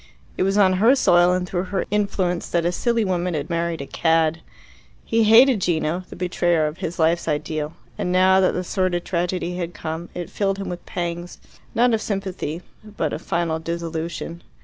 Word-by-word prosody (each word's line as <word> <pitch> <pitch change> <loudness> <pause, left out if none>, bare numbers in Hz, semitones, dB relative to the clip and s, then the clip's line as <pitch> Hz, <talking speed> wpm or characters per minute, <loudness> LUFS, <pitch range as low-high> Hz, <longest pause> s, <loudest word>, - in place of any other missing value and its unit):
It - - -3
was 195 +2 +2
on 190 -2 +5
her 240 +5 +6
soil 175 -8 +4
and 180 0 0
through 175 +1 -2
her 190 0 -2
influence 195 -4 0
that 170 -1 0
a 175 - +2
silly 230 +4 0
woman 180 -2 -1
had 150 +3 -4
married 170 -2 -1
a - - -5
cad. 160 +1 +1 0.6
He 225 -1 +2
hated 230 +1 +6
Gino, 170 +1 0
the - - -9
betrayer 175 -3 +1
of 150 +3 -4
his 175 -2 -4
life's 165 +1 +2
ideal, 150 0 -2 0.3
and 180 - -1
now 185 +1 +5
that 185 - +3
the 180 - -2
sordid 180 -1 -1
tragedy 180 0 -2
had 175 -2 -4
come, 160 +2 -5
it 175 -1 -5
filled 195 -1 0
him 195 -2 -5
with 175 -1 -6
pangs, 175 0 -4 0.4
not 240 +1 +4
of 220 - +1
sympathy, 190 -5 -4 0.2
but 205 -8 -3
of - - -4
final 170 -2 -1
disillusion. 170 0 -4
175 Hz, 190 wpm, -22 LUFS, 165-190 Hz, 0.6 s, her